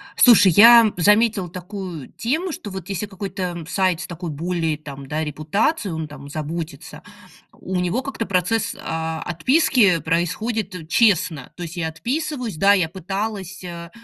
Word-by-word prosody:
Слушай, 220 -6 +7
я 230 0 +8
заметила 210 0 +3
такую 180 -4 -7
тему, 315 +10 -2
что 220 - -7
вот 190 -2 -7
если 195 +1 -2
какой-то, 195 -1 -6
м, 175 -2 -4
сайт 185 -2 +1
с 195 - -6
такой 170 0 -6
более 165 0 -2
там, 140 -3 -10
да, 155 +3 -2
репутацией, 175 - -1
он 160 -1 -4
там 140 -1 -11
заботится. 160 +2 -6 0.5
У 190 - -7
него 180 +8 0
как-то 270 -4 -4
процесс, 195 +3 0
а, 160 0 -4
отписки 210 - +3
происходит 180 +2 -2
честно. 180 - +2
То 175 - -7
есть 170 +1 -8
я 160 -2 -1
отписываюсь, 250 - -3
да, 200 +4 +5
я 180 -5 +1
пыталась, 195 +1 -5
э, 170 -1 -8
180 Hz, 155 wpm, -21 LUFS, 160-210 Hz, 0.5 s, я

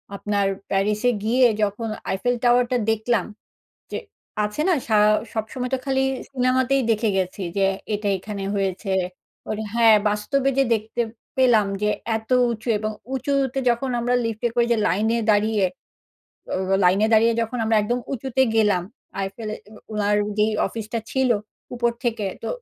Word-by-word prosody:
আপনার 200 0 0 0.2
প্যারিসে 210 +4 +1
গিয়ে 250 +3 +4 0.2
যখন 210 +2 -1 0.2
Eiffel 245 +6 0
Tower 245 0 +5
টা 250 - +3
দেখলাম, 220 -2 +1 0.7
যে - - -3 0.5
আছে 210 +7 -3
না 370 - +4
সা 220 - +3 0.4
সবসময় 245 +3 -3
তো - - 0
খালি 265 -1 +1 0.3
সিনেমাতেই 260 +1 +2
দেখে 225 0 +2
গেছি 185 +1 -2 0.2
যে 195 - +3 0.3
এটা 205 0 -2
এখানে 200 +1 -6
হয়েছে। 195 0 -2 0.6
ওর 215 - -2 0.2
হ্যাঁ 230 -2 +6
বাস্তবে 210 +7 0
যে 275 - +5
দেখতে 220 +2 -3 0.4
পেলাম 240 -5 +5 0.2
যে 210 - +2 0.3
এত 220 +2 -9 0.2
উঁচু 225 0 -5
এবং 215 +1 -2 0.2
উঁচুতে 270 0 0
যখন 240 +3 -1
আমরা 245 +1 +1
লিফট 225 0 -3
এ - - +3
করে 240 -1 +3
যে 235 - +3
লাইনে 220 +6 +1
দাঁড়িয়ে, 210 -1 +2 0.9
অ - - 0 0.3
লাইনে 190 +4 +4
দাঁড়িয়ে 225 +2 +5
যখন 230 +2 -4
আমরা 220 0 +2
একদম 240 +4 0
উঁচুতে 265 0 0
গেলাম, 210 -5 +3 0.4
আইফেল 195 +3 -5
এ - - -7 0.2
উ - - -13 0.2
ওনার 210 -1 +1 0.2
যেই 215 +1 +3
অফিসটা 225 0 -4
ছিল 265 -1 +1 0.4
উপর 240 -1 +1
থেকে, 225 -4 -1 0.2
তো 225 - -3
225 Hz, 155 wpm, -23 LUFS, 210-245 Hz, 0.9 s, হ্যাঁ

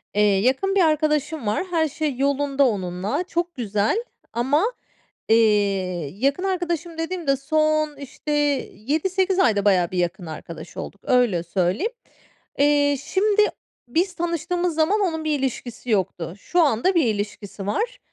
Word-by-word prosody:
Eee, 210 - +3 0.2
yakın 265 - +1
bir 390 - +5
arkadaşım 305 -4 +1
var. 215 +11 +1
Her 320 -2 +2
şey 300 -1 -2
yolunda 280 0 +2
onunla. 195 - -2
Çok 345 -1 -3
güzel 220 - 0 0.3
ama, 270 - +2 0.6
eee, 225 - +6 0.8
yakın 275 - 0
arkadaşım 345 -3 -2
dediğim 335 0 -3
de 275 0 +3
son, 310 +1 +1
işte, 285 +2 -6 0.4
7-8 370 - 0
ayda 210 - +3
bayağı 185 -4 +3
bir 185 - -3
yakın 175 +1 -1
arkadaş 160 0 -9
olduk, 200 - -7
öyle 240 -9 +3
söyleyeyim. 185 - 0 0.7
Eee, 285 0 +4
şimdi, 415 +7 +2 0.5
biz 350 +8 0
tanıştığımız 345 0 -1
zaman 325 +7 +2
onun 320 -5 -1
bir 300 -2 +1
ilişkisi 250 -2 -4
yoktu. 180 -4 -1
Şu 350 - 0
anda 295 - +2
bir 330 -5 +4
ilişkisi 205 -2 -4
var, 485 - -1
285 Hz, 140 wpm, -23 LUFS, 210-340 Hz, 0.8 s, eee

